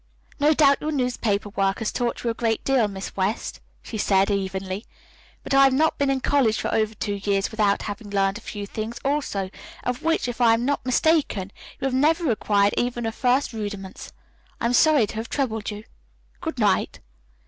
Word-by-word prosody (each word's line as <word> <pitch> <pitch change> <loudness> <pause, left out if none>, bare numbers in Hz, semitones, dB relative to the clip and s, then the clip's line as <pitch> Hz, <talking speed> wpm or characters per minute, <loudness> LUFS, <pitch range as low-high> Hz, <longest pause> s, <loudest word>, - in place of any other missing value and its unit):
"No 300 +2 +4
doubt 280 -2 +4
your 310 - -2
newspaper 245 -7 -1
work 195 -1 0
has 225 - -2
taught 240 -1 -2
you 235 - +1
a - - -3
great 225 -1 -1
deal, 260 -5 +3
Miss 195 -1 -7
West," 195 +3 -2 0.2
she 220 - -6
said 195 0 +3
evenly, 190 0 -2 0.6
"but - - -3
I 275 0 +7
have 270 -1 +5
not 310 +4 +2
been 280 -1 +2
in 270 -1 0
college 250 -7 +2
for - - -2
over 215 0 +1
two 205 -1 -3
years 195 -1 0
without 210 -2 +1
having 205 0 -6
learned 195 +1 +1
a - - -18
few 205 -2 -6
things, 220 +3 -5
also, 270 -10 -1 0.3
of 250 0 -2
which, 325 -5 +1
if 245 0 -4
I 230 -1 +6
am 235 +2 -2
not 285 +1 0
mistaken, 255 - +1 0.3
you - - -3
have 270 - 0
never 310 +3 +2
acquired 205 -2 +2
even 240 0 -1
the 225 - -1
first 255 +3 +1
rudiments. 205 -3 -6 0.5
I - - -2
am 235 - +1
sorry 295 -2 +5
to 205 - -9
have 225 +1 -4
troubled 225 -7 -2
you. 210 0 -7 0.6
Good 320 -5 -4
night." 205 -5 +1
225 Hz, 200 wpm, -24 LUFS, 205-270 Hz, 0.6 s, I